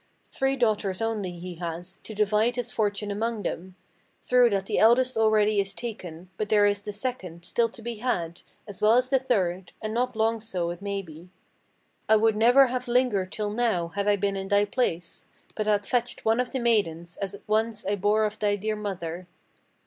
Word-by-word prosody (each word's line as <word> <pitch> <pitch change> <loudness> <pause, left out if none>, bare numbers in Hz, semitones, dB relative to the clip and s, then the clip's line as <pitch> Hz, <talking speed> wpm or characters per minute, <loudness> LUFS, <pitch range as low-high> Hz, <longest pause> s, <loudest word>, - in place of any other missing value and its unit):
Three 270 0 +1
daughters 210 -6 0
only 215 -5 -2
he 175 0 -8
has, 170 +1 -5
to 220 - -9
divide 215 +3 +2
his 245 -1 -3
fortune 205 -1 -1
among 220 +1 -2
them. 185 +2 -5 0.5
True 250 -1 +5
that 195 -2 -1
the - - 0
eldest 250 +3 +5
already 215 -1 +3
is 195 0 -2
taken; 185 -7 -7
but 210 - -3
there 205 -1 +5
is 205 0 +1
the 210 0 -6
second 195 -7 -4
Still 230 +5 +1
to 230 - -14
be 235 -1 -5
had, 175 -8 -2 0.3
as 205 -3 -8
well 215 +1 +5
as 250 +1 +2
the 265 0 +3
third; 190 -8 -1
and 215 0 -4
not 250 +1 -1
long 225 +1 +1
so, 185 -6 -3
it 175 +2 -8
may 200 -1 -3
be. 165 +1 -13 0.8
I 220 - +7
would 220 0 +3
never 245 +5 +6
have 255 0 -3
lingered 240 -7 +1
till 210 -2 -3
now, 215 -7 0
had 200 +3 -3
I 205 - +5
been 200 0 -1
in 195 0 -4
thy 205 0 +3
place; 190 -7 -2 0.3
But 215 -1 -3
had 205 -1 +2
fetched 245 +1 -1
one 225 +2 +3
of 250 0 0
the 265 - -3
maidens, 180 -8 0
as 200 0 -4
once 215 0 0
I 200 +2 +1
bore 210 +2 +2
off 210 +1 -4
thy 205 -1 +2
dear 215 +2 -2
mother." 185 -4 -5
210 Hz, 200 wpm, -26 LUFS, 190-230 Hz, 0.8 s, I